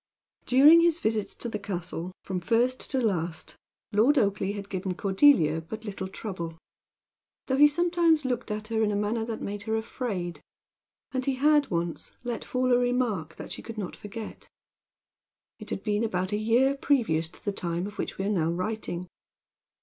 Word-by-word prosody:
During 295 +6 +8
his 340 -1 +3
visits 220 -9 -1
to - - -3
the 215 -2 -3
castle, 180 -3 -4
from 185 -1 -3
first 240 +7 +1
to 265 - 0
last, 170 -8 -1 0.4
Lord 240 +9 +4
Oakleigh 200 -2 +1
had 200 -1 -6
given 190 -2 -3
Cordelia 190 - +4
but 215 +7 -8
little 195 -2 -4
trouble; 180 -5 -6 0.9
though 265 - 0
he 295 +1 +9
sometimes 335 -1 +2
looked 250 -2 -2
at 215 +1 -4
her 225 -1 0
in 210 -1 +2
a - - -1
manner 210 +3 0
that 225 -1 -5
made 205 0 -4
her 220 - +2
afraid. 195 - -3 0.7
And 260 -1 -1
he 270 0 0
had 295 +1 +4
once 170 -2 -3
let 240 -2 -3
fall 255 0 +1
a 245 - +5
remark 245 -10 0
that - - -9
she - - -6
could 230 -1 -9
not 200 -4 -4
forget. 215 +1 -8 1.1
It 215 -1 -8
had 195 - -3
been 210 0 0
about 185 -3 -1
a - - +1
year 240 +6 +3
previous 225 - +1
to - - -15
the 205 - +1
time 175 -2 -2
of 205 +1 -8
which - - -3
we 195 - -2
are - - 0
now 170 -6 +1
writing. 180 0 -3
215 Hz, 180 wpm, -27 LUFS, 185-250 Hz, 1.1 s, he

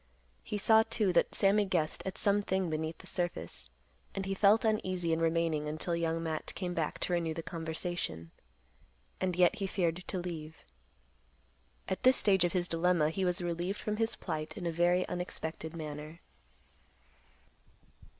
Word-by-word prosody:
He 210 - -4
saw, 220 +2 +6
too, 210 -5 +1
that - - +3
Sammy 205 +1 +4
guessed 170 -5 0
at 190 - -4
some 205 0 +3
thing 190 -3 -1
beneath 160 +1 -2
the - - -14
surface, 175 -2 -3 0.5
and 195 -1 -2
he 195 - -1
felt 205 +3 +4
uneasy 185 -6 +1
in 160 - +1
remaining 165 -2 +1
until 155 +3 -2
Young 165 0 -1
Matt 160 -1 -4
came 180 -2 -3
back 160 -3 -1
to 180 - 0
renew 165 -2 0
the 165 - -4
conversation. 160 - -4 0.9
And 185 -2 0
yet 180 +4 +4
he 195 -2 -1
feared 175 -3 0
to 185 +1 -5
leave. 160 -3 -6 1.2
At 190 - -2
this 255 0 +6
stage 190 -4 +4
of 175 - +1
his 180 -2 +1
dilemma, 165 -2 +2
he 190 +3 -2
was 180 0 +1
relieved 175 +3 -2
from 210 0 -2
his 225 0 +1
plight 155 +1 -4
in 185 - -5
a 170 - 0
very 175 +2 +2
unexpected 160 -2 -4
manner. 155 +1 -7
175 Hz, 165 wpm, -32 LUFS, 160-190 Hz, 1.2 s, saw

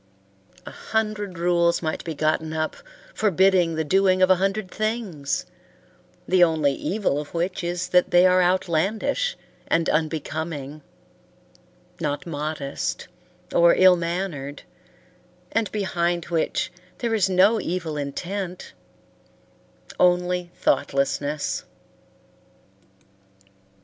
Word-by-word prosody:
A - - -8
hundred 210 -4 -3
rules 170 0 +2
might 155 - -2
be 165 -2 -5
gotten 155 +1 0
up 155 0 -2 0.4
forbidding 190 -4 +3
the 160 - 0
doing 185 +3 +3
of 185 - +5
a 185 - +5
hundred 195 +1 -1
things, 215 -10 -2 0.8
the 185 -1 +5
only 155 -4 +2
evil 185 -2 -1
of 150 - -11
which 175 +2 -2
is 175 +1 -2
that 180 0 +3
they 175 +1 +5
are 185 0 +5
outlandish 190 - 0 0.3
and 165 -1 +1
unbecoming; 155 -2 -3 1.2
not 145 -3 -2
modest, 150 -3 -4 0.4
or 170 0 +5
ill 185 -1 +7
mannered, 170 -5 -4 0.9
and 225 -1 0
behind 175 -4 -1
which 165 -2 -1 0.3
there 235 -2 -2
is 200 -4 +2
no 195 +5 +4
evil 170 -3 -3
intent 180 +6 -5 1.3
only 180 0 +2
thoughtlessness. 140 +2 0
175 Hz, 105 wpm, -24 LUFS, 155-190 Hz, 1.3 s, ill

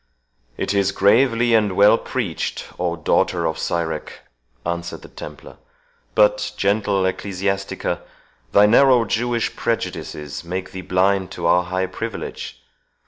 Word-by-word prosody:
"It - - -1
is 100 -1 +2
gravely 115 +4 +3
and 105 -3 +3
well 100 +3 +7
preached, 110 -11 -3
O 90 -1 0
daughter 80 - +1
of 80 0 -1
Sirach!" 80 -2 -3 0.4
answered 85 0 -4
the - - -10
Templar; - - -10 0.6
"but, - - +3
gentle 100 -1 +1
Ecclesiastics, 95 +1 -2 0.5
thy 100 - +6
narrow 125 +2 +5
Jewish 120 +1 -1
prejudices 75 -10 -3
make 90 +2 -5
thee 95 - -6
blind 95 +1 +1
to 85 - -5
our 90 +1 +4
high 95 +1 -1
privilege. - - -6
95 Hz, 125 wpm, -21 LUFS, 90-110 Hz, 0.6 s, well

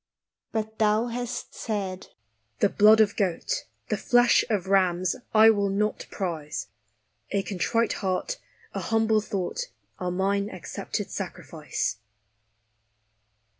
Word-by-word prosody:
But 220 0 -3
Thou 215 +2 +3
hast 245 0 -4
said, 195 -4 -4 0.3
" 110 -1 -45
The - - +4
blood 215 +2 +6
of 205 -1 +3
goat, 205 - -1 0.2
The - - +1
flesh 245 0 +4
of 205 -5 0
rams, 185 -2 +2 0.2
I 220 0 +8
will 200 -2 +1
not 210 +2 -1
prize; 150 - -4 0.6
A 200 - 0
contrite 220 +5 0
heart, 195 - -1 0.3
a - - -2
humble 220 -1 +2
thought, 210 - -3 0.3
Are 180 - -1
mine 200 +3 0
accepted 185 - -5
sacrifice." - - -3
205 Hz, 120 wpm, -26 LUFS, 185-220 Hz, 0.6 s, I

